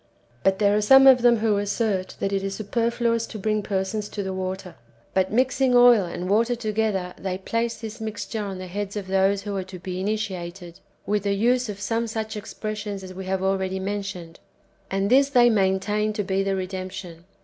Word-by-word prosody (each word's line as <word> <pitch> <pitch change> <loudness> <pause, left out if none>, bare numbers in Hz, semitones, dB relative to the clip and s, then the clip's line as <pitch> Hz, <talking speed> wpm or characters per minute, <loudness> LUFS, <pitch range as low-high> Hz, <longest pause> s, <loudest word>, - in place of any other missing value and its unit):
But 190 0 +2
there 205 0 +3
are 210 - +2
some 270 +6 +7
of 260 -2 +8
them 240 -1 +5
who 215 -1 +1
assert 205 -2 -1
that 195 - -1
it 195 - +1
is 195 0 -3
super 230 +3 -1
fluous 235 -1 0
to - - -7
bring 215 +1 0
persons 200 +1 -2
to 205 - -4
the 190 0 -3
water, 185 0 -4 0.4
but 190 0 +1
mixing 255 +2 +2
oil 245 -5 +7
and 175 +1 -5
water 230 +5 +2
together, 215 -5 -1
they 185 -1 -3
place 230 +4 -2
this 225 -1 -7
mixture 220 0 -4
on 195 -2 -5
the 185 - -6
heads 200 +2 -5
of 200 - -4
those 195 +1 +2
who 205 -1 -4
are 190 - -2
to 190 -1 -9
be 180 +1 -5
initiated, 185 -4 -4 0.3
with 210 0 0
the 200 0 0
use 245 +3 +2
of 200 -1 -6
some 230 +2 -1
such 220 0 -4
expressions 210 -1 -5
as 185 0 -8
we 190 0 -7
have 190 0 -1
already 190 0 0
mentioned. 195 -4 -5 0.5
And 195 +1 0
this 275 +2 +5
they 245 -3 +5
maintain 205 +1 +1
to 210 - -2
be 190 0 0
the 195 0 0
redemption. 185 -2 -6
200 Hz, 205 wpm, -24 LUFS, 190-220 Hz, 0.5 s, of